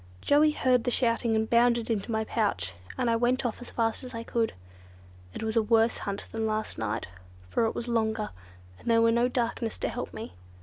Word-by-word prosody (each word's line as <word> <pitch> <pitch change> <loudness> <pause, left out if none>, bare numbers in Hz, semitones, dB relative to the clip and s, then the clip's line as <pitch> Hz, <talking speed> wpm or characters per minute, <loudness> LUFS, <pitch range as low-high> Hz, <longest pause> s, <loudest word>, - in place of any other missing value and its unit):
Joey 295 - +4
heard 255 -5 +2
the - - 0
shouting 230 -2 +1
and 220 0 +1
bounded 235 0 +3
into 220 +1 -1
my 220 0 +1
pouch, 210 - -1 0.2
and 255 - 0
I 230 - +3
went 245 +3 +1
off 240 - -2
as 245 - -8
fast 225 +2 -1
as 250 -1 -8
I 230 - -4
could. 230 -1 0 0.8
It - - -4
was 220 0 -2
a 225 - +5
worse 225 +1 +3
hunt 200 0 -4
than 225 0 -1
last 215 - -2
night, 110 -1 -2 0.5
for 230 - +2
it 225 - -1
was 235 - -3
longer, 220 -2 0 0.5
and - - -5
there 230 0 +5
was 230 0 +4
no 235 +1 +3
darkness 235 -2 -1
to - - -1
help - - -5
me. - - -7
230 Hz, 215 wpm, -28 LUFS, 220-240 Hz, 0.8 s, a